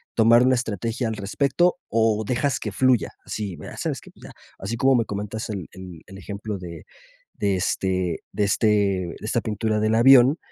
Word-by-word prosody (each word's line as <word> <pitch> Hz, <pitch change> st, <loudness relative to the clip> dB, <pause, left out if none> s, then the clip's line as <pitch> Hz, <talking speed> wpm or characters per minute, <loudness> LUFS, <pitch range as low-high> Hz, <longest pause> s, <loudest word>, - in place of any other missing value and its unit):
tomar 115 Hz, +2 st, +5 dB
una 130 Hz, +1 st, +4 dB
estrategia 115 Hz, +1 st, -3 dB
al 110 Hz, -, -3 dB
respecto, 140 Hz, -, +1 dB
o, 110 Hz, -1 st, +1 dB
dejas 125 Hz, +4 st, 0 dB
que 105 Hz, -, -4 dB
fluya. 130 Hz, +1 st, +2 dB, 0.2 s
Así, 100 Hz, -5 st, -5 dB, 0.2 s
¿sabes -, -, -2 dB
qué? -, -, -15 dB
Pues -, -, -21 dB
ya, -, -, -10 dB, 0.3 s
así 110 Hz, +5 st, -4 dB
como 135 Hz, +2 st, +3 dB
me 115 Hz, -2 st, +2 dB
comentas 105 Hz, +2 st, -5 dB
el 95 Hz, -6 st, -5 dB
el 90 Hz, -3 st, -11 dB
el 95 Hz, -, -11 dB
ejemplo 100 Hz, +1 st, -6 dB
de 85 Hz, -2 st, -9 dB, 0.5 s
de 100 Hz, -1 st, 0 dB
este 90 Hz, -2 st, -1 dB
de 105 Hz, -, -1 dB
este 100 Hz, +2 st, +1 dB
de 100 Hz, -4 st, +1 dB
esta 110 Hz, +2 st, -1 dB
pintura 110 Hz, 0 st, -1 dB
del 110 Hz, +1 st, +1 dB
avión, 130 Hz, +4 st, +6 dB
110 Hz, 185 wpm, -23 LUFS, 100-120 Hz, 0.5 s, avión